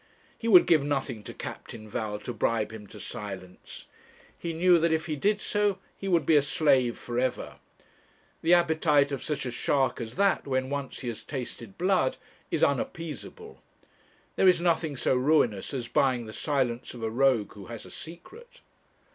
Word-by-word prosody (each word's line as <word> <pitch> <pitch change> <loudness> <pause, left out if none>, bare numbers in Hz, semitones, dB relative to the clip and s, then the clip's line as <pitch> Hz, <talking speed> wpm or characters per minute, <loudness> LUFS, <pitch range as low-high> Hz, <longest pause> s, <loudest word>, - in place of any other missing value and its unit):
He 230 - -5
would 185 -6 +8
give 155 -4 +4
nothing 135 -5 -2
to - - -6
Captain 110 -2 -8
Val 105 0 -3
to 120 - -5
bribe 110 0 0
him 105 -2 -9
to - - -11
silence. 95 -3 -7 0.5
He 170 - -4
knew 175 +1 +4
that 165 0 +2
if 160 0 0
he 155 - -2
did 205 +8 +1
so, 205 -2 +1 0.2
he 195 - -6
would 170 -6 +2
be 160 - +4
a 145 - +6
slave 135 -4 +2
for 120 0 -3
ever. 130 0 -2 0.8
The 170 +2 +5
appetite 155 -4 +3
of 140 - -3
such 150 -3 -3
a 125 - -3
shark 130 +1 0
as 115 0 -6
that, 200 -5 +2
when 130 0 -1
once 140 -2 -4
he 125 - -5
has 115 - -5
tasted 120 -6 -6
blood, 180 -7 +2 0.3
is - - 0
unappeasable. 165 - -3 0.8
There 190 - +6
is 175 -2 +4
nothing 165 -4 0
so - - +1
ruinous 125 -6 +2
as 125 -4 -4
buying 125 -2 +1
the 110 - -9
silence 130 -4 -1
of 115 - -8
a 110 - 0
rogue 125 -3 +2
who 100 -3 -11
has 115 -2 -8
a - - -12
secret. 390 - -11
140 Hz, 180 wpm, -28 LUFS, 120-165 Hz, 0.8 s, would